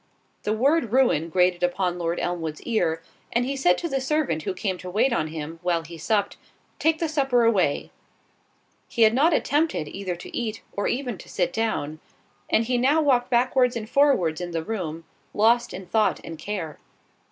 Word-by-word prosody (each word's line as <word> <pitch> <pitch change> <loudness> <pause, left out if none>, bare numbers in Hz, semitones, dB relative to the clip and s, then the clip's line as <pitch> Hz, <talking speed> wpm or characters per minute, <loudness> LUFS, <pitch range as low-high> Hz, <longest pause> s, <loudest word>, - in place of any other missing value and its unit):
The 210 - -1
word 270 +2 +2
ruin 230 - +3
grated 180 0 +2
upon 180 0 0
Lord 170 0 -1
Elmwood's 165 -3 -3
ear, 170 -8 0 0.3
and 240 +1 +1
he 275 +2 -2
said 180 -10 +3
to 340 - -3
the 270 -4 -1
servant 270 - 0
who 155 - -3
came 185 -1 -2
to 185 - -7
wait 220 +7 +2
on 155 - 0
him, 160 +1 -6
while 175 -2 0
he 170 +1 -10
supped, 200 +5 -1 0.4
"Take 320 +1 +2
the 330 - -1
supper 270 -6 +2
away." 195 -10 +1 1.0
He 230 - +2
had 220 0 +6
not 295 +7 +4
attempted 300 - +1
either 185 +2 -4
to 175 - -10
eat, 225 -2 -3
or 200 - -1
even 245 -6 -2
to - - -12
sit 175 -1 -1
down; 155 -9 -2 0.5
and 225 - +3
he 245 +1 0
now 280 +6 +3
walked 260 -5 +2
backwards 250 0 +3
and 220 -2 -4
forwards 220 - +2
in 175 - -4
the 165 -1 -2
room, 165 -6 -4 0.3
lost 235 +3 +3
in 190 - -7
thought 215 +4 +1
and 165 -2 -8
care. 170 -5 -5
210 Hz, 185 wpm, -25 LUFS, 175-250 Hz, 1.0 s, had